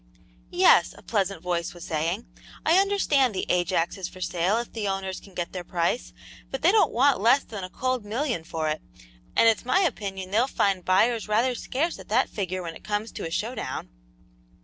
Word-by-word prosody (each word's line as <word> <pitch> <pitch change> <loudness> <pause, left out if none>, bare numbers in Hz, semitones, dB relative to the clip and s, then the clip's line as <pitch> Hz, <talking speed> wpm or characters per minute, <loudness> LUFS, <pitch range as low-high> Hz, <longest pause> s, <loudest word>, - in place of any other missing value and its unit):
"Yes," - - +5
a - - -15
pleasant 195 -5 -1
voice 175 -1 -2
was 175 - -10
saying, 165 +8 -1 0.4
"I 335 +4 +5
understand 295 - +2
the 185 - -1
Ajax 175 0 +1
is 185 - -3
for 185 - -13
sale 180 +3 0
if 235 0 -4
the 215 -3 -2
owners 195 -1 -3
can 195 -2 -17
get 175 -1 -3
their 180 -2 -5
price, 175 +7 -1 0.4
but 270 - -5
they 350 - +6
don't 415 -5 +4
want 265 -2 +3
less 245 +6 +5
than 205 -4 -7
a 185 - -5
cold 255 +2 -2
million 230 - -2
for 160 -1 -3
it, 155 0 -2 0.5
and 230 - +5
it's 225 - +3
my 255 +10 +3
opinion 195 - -2
they'll 230 +5 +3
find 195 -8 +1
buyers 220 +5 +2
rather 230 +5 +2
scarce 285 +7 -2
at - - -11
that 240 +5 +2
figure 185 -2 -3
when 165 -1 -6
it - - -13
comes 210 +1 -2
to - - -5
a - - -6
show 220 +9 -2
down." - - -5
205 Hz, 205 wpm, -26 LUFS, 180-250 Hz, 0.5 s, they